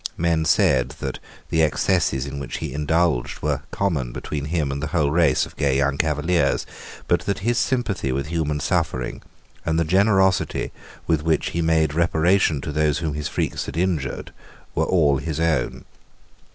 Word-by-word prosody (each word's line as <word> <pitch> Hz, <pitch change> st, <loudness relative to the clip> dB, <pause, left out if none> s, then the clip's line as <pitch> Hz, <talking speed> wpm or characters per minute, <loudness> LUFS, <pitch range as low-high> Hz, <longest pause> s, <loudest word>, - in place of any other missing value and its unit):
Men 80 Hz, -1 st, +1 dB
said 65 Hz, -4 st, +3 dB
that -, -, -4 dB, 0.3 s
the 80 Hz, -, +3 dB
excesses 65 Hz, -3 st, +1 dB
in 70 Hz, 0 st, -5 dB
which 70 Hz, -, -5 dB
he -, -, -5 dB
indulged 75 Hz, -2 st, 0 dB
were 75 Hz, -3 st, 0 dB
common 80 Hz, -11 st, -1 dB
between 70 Hz, +3 st, -4 dB
him 75 Hz, -3 st, -1 dB
and 70 Hz, +1 st, -4 dB
the 80 Hz, -, -2 dB
whole 75 Hz, -5 st, +1 dB
race 80 Hz, -3 st, +3 dB
of -, -, -14 dB
gay 70 Hz, -2 st, +2 dB
young 70 Hz, 0 st, +1 dB
Cavaliers, 80 Hz, -1 st, +1 dB, 0.4 s
but -, -, +3 dB
that 100 Hz, 0 st, -2 dB
his 120 Hz, 0 st, +2 dB
sympathy 110 Hz, -, 0 dB
with 70 Hz, +2 st, -1 dB
human 75 Hz, -2 st, -1 dB
suffering 65 Hz, -2 st, -1 dB, 0.4 s
and 80 Hz, 0 st, 0 dB
the 85 Hz, -, +2 dB
generosity 95 Hz, +1 st, +2 dB, 0.3 s
with 80 Hz, -3 st, +1 dB
which 80 Hz, 0 st, 0 dB
he 85 Hz, -, -1 dB
made 80 Hz, -2 st, +2 dB
reparation 85 Hz, -1 st, +2 dB
to 75 Hz, -, -4 dB
those 75 Hz, -1 st, +1 dB
whom 80 Hz, -3 st, -2 dB
his 75 Hz, 0 st, -3 dB
freaks -, -, -2 dB
had 70 Hz, -, -6 dB
injured 85 Hz, -6 st, -2 dB, 0.4 s
were -, -, +1 dB
all 75 Hz, -7 st, +3 dB
his 80 Hz, -2 st, -4 dB
own. 80 Hz, -1 st, 0 dB
80 Hz, 170 wpm, -23 LUFS, 70-85 Hz, 0.4 s, said